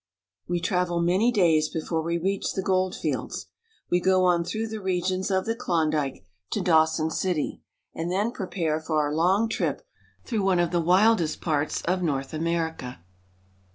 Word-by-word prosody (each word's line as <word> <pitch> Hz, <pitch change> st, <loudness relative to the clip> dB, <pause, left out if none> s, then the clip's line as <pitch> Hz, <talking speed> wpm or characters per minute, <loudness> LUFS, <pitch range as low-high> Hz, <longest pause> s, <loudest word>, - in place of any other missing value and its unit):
We 175 Hz, 0 st, 0 dB
travel 180 Hz, 0 st, 0 dB
many 185 Hz, +8 st, +3 dB
days 165 Hz, -8 st, +3 dB
before 160 Hz, 0 st, -2 dB
we 170 Hz, +1 st, -1 dB
reach 195 Hz, +3 st, -1 dB
the 190 Hz, -, -2 dB
gold 185 Hz, -1 st, +1 dB
fields. -, -, -3 dB, 0.5 s
We 175 Hz, -, +4 dB
go 185 Hz, 0 st, +3 dB
on 175 Hz, -1 st, +3 dB
through 220 Hz, +5 st, -3 dB
the 220 Hz, -1 st, -5 dB
regions 185 Hz, 0 st, -1 dB
of 190 Hz, -1 st, +1 dB
the 225 Hz, -, 0 dB
Klondike 155 Hz, -, -1 dB, 0.3 s
to -, -, 0 dB
Dawson 160 Hz, -1 st, +3 dB
City, 180 Hz, -4 st, -1 dB, 0.3 s
and 165 Hz, +2 st, -3 dB
then 205 Hz, +5 st, 0 dB
prepare 175 Hz, -8 st, -2 dB
for 155 Hz, -1 st, -1 dB
our 145 Hz, -1 st, 0 dB
long 185 Hz, +8 st, +3 dB
trip 225 Hz, -, -2 dB, 0.4 s
through 225 Hz, -4 st, -1 dB
one 190 Hz, -2 st, +2 dB
of 175 Hz, -1 st, +1 dB
the 175 Hz, -1 st, +1 dB
wildest 180 Hz, -1 st, +3 dB
parts 150 Hz, -3 st, -1 dB
of 180 Hz, +2 st, 0 dB
North 140 Hz, -5 st, -2 dB
America. 160 Hz, -, -3 dB
175 Hz, 165 wpm, -26 LUFS, 160-190 Hz, 0.5 s, We